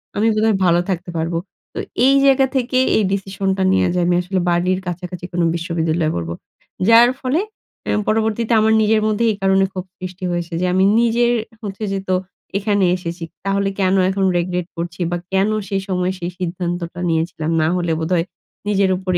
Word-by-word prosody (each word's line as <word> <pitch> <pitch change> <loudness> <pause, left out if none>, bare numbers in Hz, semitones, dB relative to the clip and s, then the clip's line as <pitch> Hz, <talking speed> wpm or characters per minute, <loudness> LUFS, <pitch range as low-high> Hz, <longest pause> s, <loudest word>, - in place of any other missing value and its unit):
আমি 215 +2 +2
বোধহয় 215 0 +2
ভালো 170 -1 +4
থাকতে 180 -1 -3
পারব। 165 +1 -2 0.4
তো - - -5 0.3
এই 270 +1 +5
জায়গা 270 -1 +5
থেকে 255 0 0 0.2
এই 220 - +2
ডিসিশনটা 195 0 -1
নেয়া 190 - +3
যে 180 - 0
আমি 175 0 +2
আসলে 185 +1 -2
বাড়ির 180 +2 +1
কাছাকাছি 180 0 -5
কোনো 175 -1 +1
বিশ্ববিদ্যালয়ে 165 -1 -1
পড়বো। 85 -1 -3 0.6
যার 230 +1 +8
ফলে 265 +5 +1 0.5
অ্যা - - 0
পরবর্তীতে 220 +1 +1
আমার 220 +1 +3
নিজের 215 0 +3
মধ্যে 215 +1 0
এই - - -3
কারণে 195 0 +3
ক্ষোভ 185 -1 -5
সৃষ্টি 185 0 -7
হয়েছে 175 0 -3
যে - - +1
আমি 190 +1 +3 0.2
নিজের 235 +1 +3 0.3
হচ্ছে 200 +1 -5
যে 195 - -1
তো 185 - +3 0.4
এখানে 200 -1 +1
এসেছি 170 -1 -6 0.2
তাহলে 195 0 +1
কেন 190 0 +2
এখন 195 0 0
regret 175 0 -2
করছি 170 +1 -5
বা 175 - 0 0.2
কেন 195 +2 +3 0.2
সেই 195 -1 -1
সময় 180 -1 0
সেই 175 0 -4
সিদ্ধান্তটা 175 -1 -3
নিয়েছিলাম 160 -1 -1
না 155 - +2
হলে 175 -2 -1
বোধহয় 165 +1 0 0.4
নিজের 200 -2 +2
উপরে 185 -1 -1
185 Hz, 180 wpm, -19 LUFS, 175-205 Hz, 0.6 s, যার